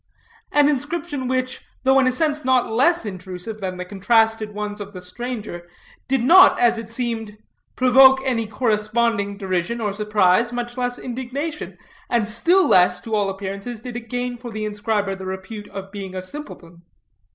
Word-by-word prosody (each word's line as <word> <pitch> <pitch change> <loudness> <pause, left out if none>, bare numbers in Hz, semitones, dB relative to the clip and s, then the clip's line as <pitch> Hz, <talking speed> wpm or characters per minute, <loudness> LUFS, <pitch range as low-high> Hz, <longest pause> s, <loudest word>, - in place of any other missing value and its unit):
An 290 -1 +4
inscription 290 -1 -2
which, 255 0 -2 0.2
though 265 0 +5
in 260 - +3
a - - +3
sense 300 +2 0
not 255 -2 +2
less 270 +5 +2
intrusive 185 +2 -6
than 185 -1 -4
the 180 - -5
contrasted 220 +2 +1
ones 210 0 -5
of 205 0 -8
the 185 - -7
stranger, 205 -2 -7 0.4
did 265 -2 +1
not, 360 +9 +7
as 235 -1 +3
it 225 -1 -8
seemed, 225 -3 -3 0.4
provoke 265 +1 +6
any 230 -4 0
corresponding 215 -2 0
derision 190 +3 -2
or 210 -3 -2
surprise, 210 +1 +2
much 240 0 -4
less 245 -1 -2
indignation; 260 +5 -5 0.3
and 235 -4 +1
still 340 - +3
less, 180 0 +4
to 225 - -7
all 205 -2 +1
appearances, 195 +4 -5
did 245 +1 -8
it 230 -2 -7
gain 245 0 -3
for 240 0 -8
the 215 -1 -4
inscriber 205 -1 -1
the 190 0 -8
repute 190 +3 -7
of 195 0 -8
being 195 -2 -7
a 185 - -3
simpleton. 185 - -9
225 Hz, 170 wpm, -22 LUFS, 200-250 Hz, 0.4 s, not